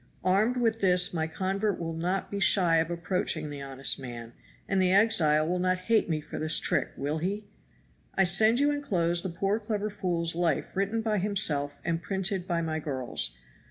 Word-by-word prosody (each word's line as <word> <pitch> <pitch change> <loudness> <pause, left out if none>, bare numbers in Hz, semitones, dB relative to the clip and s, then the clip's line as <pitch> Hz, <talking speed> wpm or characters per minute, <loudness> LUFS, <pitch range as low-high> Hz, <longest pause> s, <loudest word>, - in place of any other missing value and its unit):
Armed 210 +7 +2
with 225 -2 +1
this 180 -2 +4
my 160 -2 -1
convert 195 +4 -2
will 165 -1 -4
not 180 +4 -2
be 200 - -3
shy 175 -3 +4
of 160 0 +1
approaching 170 -3 -2
the 145 -1 -7
honest 135 0 -1
man, 120 -3 -8 0.3
and 195 -1 +1
the 185 -1 +3
exile 165 -7 +4
will 180 +1 -1
not 185 0 +1
hate 220 +2 +1
me 155 -2 0
for 150 - -8
this 155 +1 +1
trick - - 0
will 150 +3 -2
he? 200 +5 -3 0.7
I 195 - +4
send 215 +6 +5
you 290 +1 +3
inclosed 175 -12 0
the 190 - -3
poor 195 +5 -1
clever 210 -1 -3
fool's 170 -4 -1
life 165 -3 -1
written 200 +4 0
by 215 -2 0
himself 155 -8 0
and 165 0 -1
printed 190 0 -2
by 170 -2 -1
my 160 -1 -2
girls. 130 - -3
180 Hz, 190 wpm, -28 LUFS, 160-200 Hz, 0.7 s, send